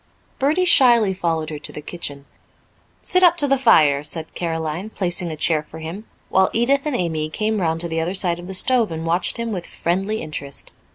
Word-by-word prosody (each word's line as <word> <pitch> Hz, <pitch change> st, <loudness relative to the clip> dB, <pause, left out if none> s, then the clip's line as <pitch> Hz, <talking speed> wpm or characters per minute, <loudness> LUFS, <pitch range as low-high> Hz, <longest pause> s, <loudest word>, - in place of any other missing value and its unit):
Bertie 305 Hz, +7 st, +2 dB
shyly 235 Hz, -, +6 dB
followed 165 Hz, -4 st, -2 dB
her 150 Hz, -, -6 dB
to -, -, -4 dB
the -, -, -8 dB
kitchen. 145 Hz, -3 st, -6 dB, 0.8 s
"Sit 365 Hz, -, +2 dB
up 350 Hz, -1 st, +6 dB
to 290 Hz, -, +3 dB
the 275 Hz, -, +3 dB
fire," 155 Hz, -, +4 dB
said 155 Hz, +2 st, -5 dB
Caroline, 165 Hz, +3 st, -4 dB
placing 180 Hz, -4 st, -2 dB
a -, -, -5 dB
chair 155 Hz, 0 st, +1 dB
for 155 Hz, +1 st, -13 dB
him, 165 Hz, +7 st, -7 dB, 0.2 s
while 190 Hz, 0 st, +3 dB
Edith 275 Hz, +5 st, +1 dB
and 295 Hz, -, -1 dB
Amy 160 Hz, -6 st, -2 dB
came 215 Hz, +4 st, -1 dB
round 165 Hz, -1 st, 0 dB
to 170 Hz, -, 0 dB
the 165 Hz, -1 st, -3 dB
other 175 Hz, +4 st, -2 dB
side 175 Hz, -3 st, -1 dB
of 175 Hz, -, -10 dB
the 190 Hz, -, -3 dB
stove 235 Hz, 0 st, +2 dB
and 160 Hz, 0 st, -5 dB
watched 170 Hz, +6 st, +2 dB
him 235 Hz, -1 st, -3 dB
with 180 Hz, -4 st, -5 dB
friendly 195 Hz, +5 st, -2 dB
interest. 145 Hz, -3 st, -6 dB
175 Hz, 210 wpm, -20 LUFS, 160-220 Hz, 0.8 s, shyly